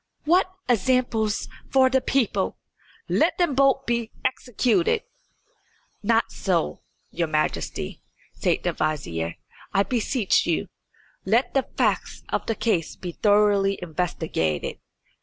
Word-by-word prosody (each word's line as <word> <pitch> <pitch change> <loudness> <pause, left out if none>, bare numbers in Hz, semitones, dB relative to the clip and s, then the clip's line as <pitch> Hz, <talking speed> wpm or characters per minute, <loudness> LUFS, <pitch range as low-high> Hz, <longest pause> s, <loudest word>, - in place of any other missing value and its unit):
"What 360 +4 +3 0.2
examples 235 -2 +1 0.2
for 265 -1 +5
the 260 0 +2
people! 265 -4 0 0.5
Let - - +2
them 350 -6 +2
both 270 0 +3
be 235 -2 -1 0.2
executed." 245 -6 +1 1.0
"Not - - +2
so, 75 0 -1 0.3
your 170 -1 -1
Majesty," 155 0 -2 0.3
said - - 0
the - - 0
vizier, 85 - -2 0.4
"I 195 - +4
beseech 230 0 +1
you. - - 0 0.5
Let 230 +6 +2
the 270 - +1
facts - - 0
of - - -2
the 225 - 0
case 210 -8 0
be 180 - -6
thoroughly 205 0 +3
investigated. 160 - -2
215 Hz, 115 wpm, -24 LUFS, 175-255 Hz, 1.0 s, for